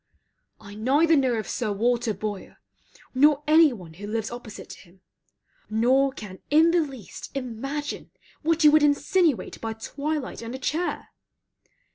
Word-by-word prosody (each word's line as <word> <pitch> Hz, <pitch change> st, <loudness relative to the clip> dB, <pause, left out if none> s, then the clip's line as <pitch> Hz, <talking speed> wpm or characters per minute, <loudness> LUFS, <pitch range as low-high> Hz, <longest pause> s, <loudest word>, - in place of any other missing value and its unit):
I 205 Hz, -1 st, -12 dB
neither 285 Hz, +10 st, +3 dB
know 255 Hz, -5 st, +2 dB
Sir 220 Hz, -1 st, -3 dB
Walter 235 Hz, +3 st, +1 dB
Boyer, 210 Hz, -3 st, -6 dB, 0.6 s
nor 290 Hz, +2 st, +4 dB
any 310 Hz, 0 st, +6 dB
one 180 Hz, -9 st, -10 dB
who 200 Hz, +5 st, -9 dB
lives 220 Hz, +1 st, -3 dB
opposite 240 Hz, -3 st, -9 dB
to -, -, -11 dB
him, 185 Hz, 0 st, -20 dB, 0.7 s
nor 255 Hz, +5 st, +3 dB
can 205 Hz, -7 st, -10 dB
in 320 Hz, +3 st, +5 dB
the 345 Hz, 0 st, +3 dB
least 265 Hz, -, -8 dB
imagine 275 Hz, +4 st, -5 dB, 0.3 s
what 325 Hz, +1 st, +1 dB
you 300 Hz, -, +8 dB
would 310 Hz, 0 st, +5 dB
insinuate 295 Hz, -, +1 dB
by 225 Hz, -1 st, -3 dB
twilight 280 Hz, +6 st, -4 dB
and 230 Hz, +2 st, -6 dB
a -, -, -4 dB
chair. 315 Hz, +7 st, -3 dB
260 Hz, 145 wpm, -25 LUFS, 220-300 Hz, 0.7 s, you